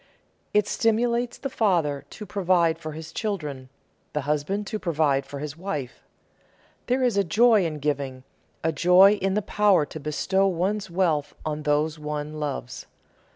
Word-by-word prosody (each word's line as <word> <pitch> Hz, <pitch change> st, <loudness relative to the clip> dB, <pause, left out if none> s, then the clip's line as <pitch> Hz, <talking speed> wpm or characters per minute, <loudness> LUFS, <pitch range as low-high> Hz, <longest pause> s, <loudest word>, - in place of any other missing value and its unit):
It 210 Hz, -1 st, +3 dB
stimulates 235 Hz, +2 st, +1 dB
the -, -, -4 dB
father 170 Hz, -, 0 dB
to 210 Hz, -, -9 dB
provide 175 Hz, -4 st, +1 dB
for 155 Hz, -2 st, -6 dB
his 160 Hz, 0 st, -8 dB
children, 150 Hz, -, -4 dB, 0.4 s
the 150 Hz, -, -1 dB
husband 150 Hz, +8 st, -1 dB
to 215 Hz, +1 st, -4 dB
provide 150 Hz, -6 st, +1 dB
for 140 Hz, -, -7 dB
his 145 Hz, +1 st, -5 dB
wife. 155 Hz, -8 st, -5 dB, 0.9 s
There 255 Hz, +1 st, +1 dB
is 240 Hz, -5 st, +2 dB
a 200 Hz, -, +4 dB
joy 210 Hz, +3 st, +4 dB
in 155 Hz, -2 st, -5 dB
giving, 140 Hz, -3 st, -3 dB, 0.4 s
a 160 Hz, -, +2 dB
joy 180 Hz, +6 st, +6 dB
in 195 Hz, 0 st, +1 dB
the 210 Hz, -, 0 dB
power 205 Hz, -7 st, +3 dB
to 155 Hz, -, -8 dB
bestow 190 Hz, +6 st, +1 dB
one's 190 Hz, +3 st, -1 dB
wealth 170 Hz, -5 st, 0 dB
on 155 Hz, -1 st, -2 dB
those 150 Hz, +2 st, 0 dB
one 150 Hz, 0 st, -4 dB
loves. 140 Hz, -4 st, -5 dB
165 Hz, 155 wpm, -25 LUFS, 150-200 Hz, 0.9 s, joy